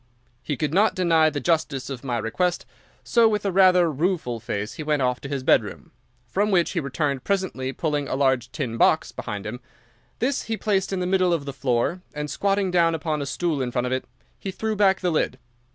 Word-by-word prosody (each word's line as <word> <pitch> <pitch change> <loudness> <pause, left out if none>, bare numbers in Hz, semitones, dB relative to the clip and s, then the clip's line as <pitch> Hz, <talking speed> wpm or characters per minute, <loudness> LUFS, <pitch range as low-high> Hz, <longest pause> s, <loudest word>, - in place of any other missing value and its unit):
He 145 - -3
could 150 +2 -1
not 205 +4 +3
deny 165 -3 +4
the 145 -1 -3
justice 150 -2 0
of 135 -2 -6
my 125 -3 -1
request, 175 +11 -1 0.4
so 235 -2 +4
with 210 -1 -1
a 195 - +1
rather 180 -2 +5
rueful 155 -6 -1
face 105 -1 -4
he - - -7
went 150 -2 0
off 125 0 0
to 140 - -7
his 140 -2 -3
bedroom, - - +1 0.4
from 200 - 0
which 180 -4 +2
he 180 - -1
returned 140 -2 -2
presently 190 -10 -1
pulling 145 -1 -2
a - - -2
large 130 -2 +1
tin 125 -7 -3
box - - +3
behind 100 -1 -6
him. 115 +3 -5 0.6
This 260 +3 -1
he 225 -1 -2
placed 195 -3 0
in 190 -1 -1
the - - 0
middle 185 -1 +2
of 155 -4 -1
the 140 - -5
floor 130 +6 0
and, 150 0 -4
squatting 195 -1 0
down 170 -2 +3
upon 155 -2 -2
a 140 - -3
stool 165 -4 -1
in 125 - -1
front 125 0 -1
of 125 - -1
it, 130 - -2 0.3
he 195 - -5
threw 220 +3 -2
back 195 -2 +3
the 180 -2 +1
lid. 150 -4 0
155 Hz, 215 wpm, -24 LUFS, 130-185 Hz, 0.6 s, rather